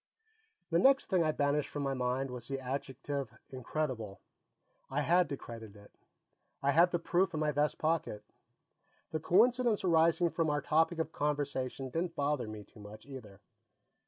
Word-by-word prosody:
The 165 - +4
next 270 +3 +4
thing 180 -3 +4
I 155 - +2
banished 145 0 0
from 145 - -4
my 135 -1 0
mind 130 +1 -1
was 120 -1 -7
the 135 -1 -3
adjective 135 -2 -4
"incredible." 130 -5 -3 0.7
I 140 +2 0
had 175 +4 +3
to 140 - -3
credit 115 -4 -10
it; 100 0 -16 0.7
I 140 - +4
had 170 +5 +5
the 175 - 0
proof 175 +1 +1
in - - -1
my 155 -1 +1
vest 150 +1 0
pocket. 155 -10 -1 0.9
The 155 - -1
coincidence 235 +6 +3
arising 170 0 +4
from 160 +1 0
our 145 0 +1
topic 160 +4 +2
of 160 -1 -2
conversation 140 -3 -2
didn't 165 +3 -2
bother 145 -5 0
me 110 -1 -7
too 105 - -19
much, 105 +1 -11
either. 125 -8 -11
145 Hz, 165 wpm, -32 LUFS, 130-165 Hz, 0.9 s, had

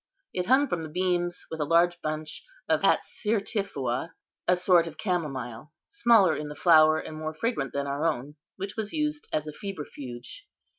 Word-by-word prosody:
It 180 0 -2
hung 265 +4 +5
from 175 -9 -2
the 160 - -6
beams, 175 +1 -1
with 160 - -5
a - - +2
large 170 +3 +3
bunch 155 0 -4 0.2
of - - +2
atsirtiphua, 195 - 0 0.3
a 180 - +5
sort 180 -2 +4
of 155 -1 -9
camomile, 150 - -3 0.2
smaller 235 - +4
in 150 - -4
the 150 - -7
flower 155 -1 +6
and 155 - -6
more 155 0 -4
fragrant 155 - -1
than 140 +1 -2
our 140 +2 -2
own, 150 -3 -1 0.2
which 195 +1 -5
was 215 -2 -3
used 300 -1 -1
as 155 - 0
a 155 - -5
febrifuge. 150 - -7
165 Hz, 175 wpm, -27 LUFS, 150-195 Hz, 0.3 s, flower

